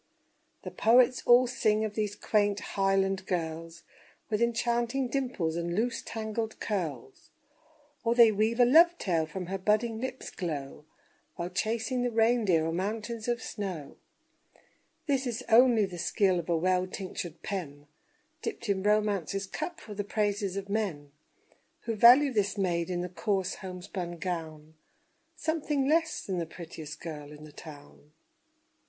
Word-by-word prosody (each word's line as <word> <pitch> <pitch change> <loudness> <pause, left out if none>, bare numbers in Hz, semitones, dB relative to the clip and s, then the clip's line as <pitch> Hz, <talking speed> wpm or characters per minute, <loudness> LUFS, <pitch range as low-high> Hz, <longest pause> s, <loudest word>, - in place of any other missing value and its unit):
The - - -6
poets 250 +2 +4
all 245 +1 +7
sing 220 -3 +1
of 210 - -4
these 210 -2 -2
quaint 205 -1 +1
Highland 195 -1 +1
girls 165 -1 -4 0.5
With 210 +1 0
enchanting 235 +2 0
dimples 245 -13 -1
and 170 0 -2
loose 230 +3 0
tangled 220 0 -4
curls; 155 - -4 0.7
Or 230 0 +1
they 235 -2 +8
weave 220 +3 0
a 245 - +7
love 335 +7 +6
tale 165 - 0
from 180 +4 -5
her 190 +2 -4
budding 220 +3 +1
lip's 260 0 -5
glow 150 -4 -5 0.5
While 175 +1 -4
chasing 230 +6 -1
the 245 - +1
reindeer 225 -7 +3
o'er 165 - -1
mountains 215 +5 -3
of 240 -1 -1
snow; 185 -9 -5 1.1
This 275 -4 0
is 235 -2 -3
only 235 -2 +6
the 180 -2 -8
skill 185 +1 +2
of 170 - -7
a 170 - +2
well 185 +2 +1
tinctured 180 -3 -6
pen, 145 -7 -5 0.6
Dipped 315 - -5
in 195 -1 +1
Romance's 200 -2 +1
cup 315 - -5
for 215 - -9
the 205 0 -3
praises 205 -2 -1
of 200 0 -4
men, 190 -9 -2 0.7
Who 230 - -3
value 250 +6 +7
this 205 -1 0
maid 175 -3 0
in 175 -1 -1
the 180 - -3
coarse 190 0 -1
homespun 180 -1 -6
gown 160 -3 -5 0.6
Something 300 -4 -1
less 320 +1 +1
than 185 -3 -2
the 165 - -3
prettiest 160 -2 -9
girl 150 -3 -7
in 150 0 -12
the 155 - -11
town. 145 0 -13
200 Hz, 150 wpm, -29 LUFS, 175-235 Hz, 1.1 s, they